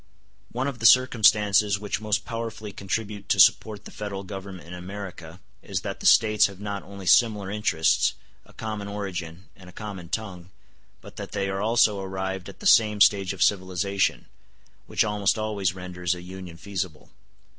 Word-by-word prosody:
One 130 Hz, +3 st, -2 dB
of 135 Hz, -4 st, -5 dB
the 115 Hz, -, +6 dB
circumstances 105 Hz, -5 st, +4 dB
which 105 Hz, 0 st, -4 dB
most 105 Hz, 0 st, -1 dB
powerfully 115 Hz, -2 st, -5 dB
contribute 100 Hz, +1 st, -4 dB
to -, -, +2 dB
support 105 Hz, -2 st, +4 dB
the -, -, -10 dB
Federal 100 Hz, -2 st, -6 dB
Government 95 Hz, -2 st, -8 dB
in 90 Hz, -, -9 dB
America 90 Hz, -2 st, -8 dB, 0.2 s
is -, -, -4 dB
that -, -, -5 dB
the -, -, 0 dB
States 110 Hz, -1 st, +5 dB
have 100 Hz, -1 st, -12 dB
not 100 Hz, -1 st, -4 dB
only 100 Hz, -1 st, -11 dB
similar 105 Hz, 0 st, +3 dB
interests, 105 Hz, -6 st, +1 dB, 0.3 s
a -, -, -20 dB
common 110 Hz, -2 st, -5 dB
origin, 95 Hz, -3 st, -6 dB
and 95 Hz, -1 st, -14 dB
a -, -, -12 dB
common 95 Hz, -4 st, -8 dB
tongue, 90 Hz, -4 st, -5 dB, 0.5 s
but -, -, -14 dB
that -, -, -7 dB
they 100 Hz, -1 st, -1 dB
are 95 Hz, 0 st, -2 dB
also 110 Hz, -2 st, +3 dB
arrived 95 Hz, -1 st, -4 dB
at -, -, -14 dB
the -, -, -9 dB
same 105 Hz, -2 st, +5 dB
stage 100 Hz, -2 st, +4 dB
of 95 Hz, -2 st, 0 dB
civilization; 95 Hz, 0 st, 0 dB, 0.6 s
which -, -, +1 dB
almost 105 Hz, -2 st, +1 dB
always 100 Hz, -4 st, -1 dB
renders 90 Hz, -1 st, -3 dB
a 90 Hz, -, -10 dB
union 90 Hz, -2 st, -9 dB
feasible. 90 Hz, -4 st, -6 dB
100 Hz, 170 wpm, -25 LUFS, 95-105 Hz, 0.6 s, the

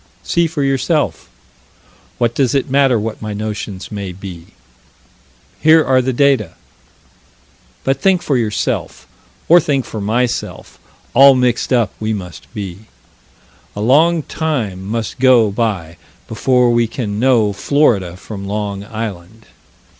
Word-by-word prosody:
See 170 Hz, -1 st, +1 dB
for 155 Hz, -3 st, -3 dB
yourself. 135 Hz, -2 st, 0 dB, 0.9 s
What 120 Hz, -1 st, +1 dB
does 135 Hz, +1 st, +1 dB
it 135 Hz, -1 st, -1 dB
matter 135 Hz, -4 st, +3 dB
what 110 Hz, +1 st, -5 dB
my 110 Hz, -1 st, -4 dB
notions 105 Hz, -2 st, -5 dB
may 100 Hz, -3 st, -5 dB
be? 90 Hz, -2 st, -10 dB, 1.1 s
Here 160 Hz, 0 st, +5 dB
are 130 Hz, -1 st, +3 dB
the 130 Hz, +1 st, -1 dB
data. 130 Hz, -, +2 dB, 1.3 s
But 135 Hz, 0 st, 0 dB
think 185 Hz, -2 st, +2 dB
for 145 Hz, -, 0 dB
yourself, 110 Hz, -4 st, -2 dB, 0.4 s
or 175 Hz, +2 st, +7 dB
think 140 Hz, -5 st, -1 dB
for 110 Hz, -, -6 dB
myself, 120 Hz, +4 st, -2 dB, 0.3 s
all 135 Hz, 0 st, +7 dB
mixed 125 Hz, -1 st, 0 dB
up 120 Hz, -4 st, +2 dB
we 110 Hz, 0 st, -1 dB
must 90 Hz, -7 st, -8 dB
be. 100 Hz, +1 st, -7 dB, 0.9 s
A 105 Hz, -, -4 dB
long 155 Hz, +8 st, +3 dB
time 120 Hz, -, -3 dB
must 115 Hz, +2 st, -4 dB
go 125 Hz, -5 st, +5 dB
by 100 Hz, -7 st, -2 dB, 0.3 s
before 125 Hz, +2 st, +2 dB
we 120 Hz, -1 st, +2 dB
can 105 Hz, -3 st, -4 dB
know 115 Hz, -5 st, +3 dB
Florida 100 Hz, -, +1 dB
from 100 Hz, 0 st, -8 dB
Long 100 Hz, -1 st, -3 dB
Island. 110 Hz, -1 st, -7 dB
115 Hz, 130 wpm, -17 LUFS, 105-135 Hz, 1.3 s, or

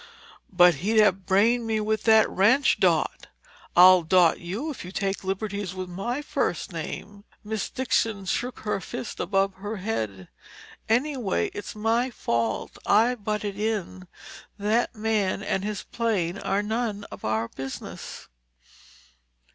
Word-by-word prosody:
"But 180 Hz, -1 st, +6 dB
he'd 220 Hz, +4 st, +1 dB
have 195 Hz, -3 st, +3 dB
brained 225 Hz, +5 st, +3 dB
me 220 Hz, -1 st, 0 dB
with 215 Hz, 0 st, -1 dB
that 220 Hz, -1 st, +6 dB
wrench, 230 Hz, +9 st, +3 dB
Dot—" -, -, +1 dB, 0.5 s
"I'll 185 Hz, +1 st, +8 dB
'Dot' 170 Hz, 0 st, +4 dB
you 210 Hz, -, -4 dB
if 280 Hz, -, -8 dB
you 180 Hz, -, -8 dB
take 195 Hz, 0 st, -2 dB
liberties 195 Hz, 0 st, -3 dB
with 185 Hz, -1 st, -5 dB
my 240 Hz, +10 st, -3 dB
first 190 Hz, -, -2 dB
name!" 200 Hz, +5 st, -6 dB, 0.2 s
Miss 215 Hz, -1 st, -3 dB
Dixon 225 Hz, -6 st, 0 dB
shook 245 Hz, +6 st, -2 dB
her 210 Hz, -2 st, -2 dB
fist 240 Hz, +1 st, -6 dB
above 195 Hz, +1 st, +1 dB
her 205 Hz, +3 st, -5 dB
head, 110 Hz, -, -3 dB, 0.6 s
"Anyway, 245 Hz, -3 st, 0 dB
it's 205 Hz, -, -7 dB
my 225 Hz, +4 st, +1 dB
fault. 115 Hz, -, -2 dB
I 225 Hz, +4 st, +4 dB
butted 210 Hz, -3 st, -3 dB
in. 205 Hz, -4 st, -3 dB, 0.5 s
That 215 Hz, +4 st, 0 dB
man 210 Hz, -2 st, 0 dB
and 190 Hz, -2 st, -1 dB
his 210 Hz, -1 st, -3 dB
plane 200 Hz, -6 st, -1 dB
are 200 Hz, +1 st, 0 dB
none 220 Hz, -1 st, -2 dB
of -, -, -10 dB
our 110 Hz, +1 st, 0 dB
business." 135 Hz, +2 st, -8 dB
205 Hz, 140 wpm, -26 LUFS, 185-225 Hz, 0.6 s, I'll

